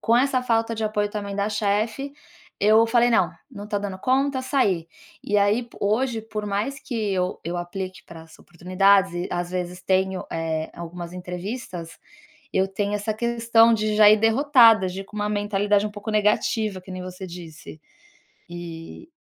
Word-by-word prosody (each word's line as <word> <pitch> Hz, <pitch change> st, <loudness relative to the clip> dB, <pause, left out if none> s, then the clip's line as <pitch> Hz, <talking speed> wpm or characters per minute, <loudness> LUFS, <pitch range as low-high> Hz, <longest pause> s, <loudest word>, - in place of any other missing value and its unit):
com 230 Hz, +1 st, +3 dB
essa 255 Hz, 0 st, +2 dB
falta 230 Hz, -1 st, +1 dB
de 220 Hz, -, -4 dB
apoio 210 Hz, -1 st, -1 dB
também 200 Hz, -1 st, -5 dB
da 200 Hz, +1 st, 0 dB
chefe, 215 Hz, +6 st, -1 dB, 0.5 s
eu 220 Hz, +2 st, +5 dB
falei: 240 Hz, +1 st, +3 dB
"Não, -, -, +3 dB, 0.2 s
não 210 Hz, -4 st, -9 dB
tô 205 Hz, -2 st, -1 dB
dando 195 Hz, -2 st, -5 dB
conta", 265 Hz, +3 st, +1 dB
saí. 200 Hz, -, +1 dB, 0.4 s
E 210 Hz, -, 0 dB
aí 205 Hz, +4 st, +2 dB
po 235 Hz, -, -17 dB
hoje, 225 Hz, +3 st, 0 dB
por 215 Hz, -1 st, -5 dB
mais 215 Hz, +8 st, -2 dB
que 220 Hz, -6 st, -3 dB
eu 180 Hz, -1 st, -1 dB
eu 175 Hz, +2 st, -3 dB
aplique 185 Hz, 0 st, -5 dB
para 165 Hz, -1 st, -11 dB
as 160 Hz, 0 st, -17 dB
oportunidades 185 Hz, +2 st, +2 dB
e 175 Hz, +1 st, -3 dB
às 175 Hz, 0 st, -3 dB
vezes 180 Hz, 0 st, -4 dB
tenho, 190 Hz, 0 st, 0 dB
eh, 160 Hz, -1 st, -2 dB
algumas 170 Hz, 0 st, -7 dB
entrevistas, 180 Hz, -1 st, -6 dB, 0.5 s
eu 190 Hz, 0 st, +2 dB
tenho 200 Hz, +1 st, -2 dB
essa 210 Hz, +1 st, -2 dB
questão 230 Hz, 0 st, +3 dB
de 215 Hz, 0 st, 0 dB
já 210 Hz, -1 st, +8 dB
ir 215 Hz, -, +7 dB
derrotada, 225 Hz, -3 st, +5 dB
de 185 Hz, +2 st, -6 dB
ir -, -, -15 dB
com 210 Hz, -, -13 dB
uma 210 Hz, 0 st, -1 dB
mentalidade 205 Hz, 0 st, +1 dB
um -, -, -5 dB
pouco 210 Hz, +1 st, -6 dB
negativa, 210 Hz, -1 st, +1 dB
que 185 Hz, -, -14 dB
nem 185 Hz, 0 st, -6 dB
você 185 Hz, +1 st, -7 dB
disse, 165 Hz, -3 st, -10 dB, 0.7 s
e 170 Hz, -, -9 dB
205 Hz, 180 wpm, -24 LUFS, 180-225 Hz, 0.7 s, já